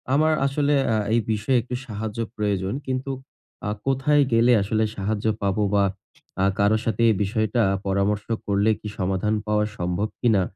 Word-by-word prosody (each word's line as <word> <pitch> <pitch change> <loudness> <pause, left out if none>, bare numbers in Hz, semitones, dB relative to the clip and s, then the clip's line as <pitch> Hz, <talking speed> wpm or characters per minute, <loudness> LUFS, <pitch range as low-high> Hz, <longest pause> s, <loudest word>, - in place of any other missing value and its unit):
আমার 155 +2 +3
আসলে 145 +1 +1 0.2
আ - - +2 0.2
এই 120 - +4
বিষয়ে 110 +4 +1
একটু 125 +2 -5
সাহায্য 110 -1 -5 0.2
প্রয়োজন। 100 -1 -1
কিন্তু 130 +1 -2 0.6
আ - - 0 0.2
কোথায় 135 +2 +3
গেলে 115 +2 +5
আসলে 110 +2 0
সাহায্য 105 +2 -2 0.2
পাবো, 100 +1 +1
বা 100 -1 +4 0.6
আ - - +4
কারো 100 +2 +4
সাথে 115 -1 -1
এই 110 - +3
বিষয়টা 110 +2 0 0.3
পরামর্শ 100 +1 0 0.2
করলে 100 +1 +2
কি - - -8
সমাধান 95 +3 0
পাওয়া 105 0 +2
সম্ভব 90 +4 -1
কিনা? 110 -6 +3
105 Hz, 160 wpm, -24 LUFS, 100-120 Hz, 0.6 s, গেলে